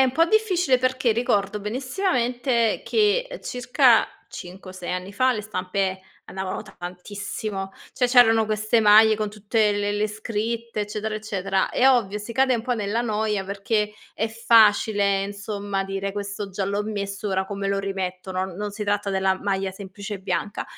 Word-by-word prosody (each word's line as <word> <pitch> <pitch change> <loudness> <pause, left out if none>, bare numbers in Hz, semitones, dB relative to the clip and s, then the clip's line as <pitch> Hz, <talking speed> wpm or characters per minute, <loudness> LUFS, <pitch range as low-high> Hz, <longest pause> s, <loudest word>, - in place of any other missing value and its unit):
è - - +7
un 255 - 0
po' 330 +4 +4
difficile, 360 - +2
perché 255 -2 +1
ricordo 210 -3 0
benissimamente 245 - 0
che, 440 +3 +2
uhm, - - -7
circa 250 0 +3 0.2
5 185 +1 -9
o - - -10
6 180 -1 -5
anni 185 +2 -4
fa 255 +5 +3
le 215 -3 -4
stampe 190 -1 -2 0.3
andavano 190 -1 -4
tantissimo. 195 +2 -6 0.2
Cioè, 250 - +1
c'erano 235 -3 +5
queste 215 +2 +1
maglie 215 0 +6
con 215 0 -2
tutte 210 +1 +1
le 205 0 -1
le 205 +1 0
scritte, 225 +2 -4
eccetera, 215 +1 -4
eccetera. 195 -3 -1
È 265 +1 +4
ovvio, 210 -5 +1
si 210 +3 -7
cade 260 +2 +3
un 225 - -2
po' 250 0 -1
nella 210 +1 -1
noia 215 -3 -1
perché 210 +2 -1 0.2
è 220 - -1
facile, 210 -3 +4
insomma, 200 -1 -4
dire: 195 0 -4
"Questo 200 0 -5
già 195 +1 -3
l'ho 200 +2 -1
messo, 200 -1 -4
ora 190 -1 0
come 200 0 -4
lo 195 0 0
rimetto?" 190 -1 -4
Non 185 +1 -2
non 205 +3 -4
si 210 +1 -5
tratta 205 0 0
della 190 0 +1
maglia 195 -1 -1
semplice 200 +1 -7
bianca. 200 +1 -3
210 Hz, 170 wpm, -24 LUFS, 195-230 Hz, 0.3 s, è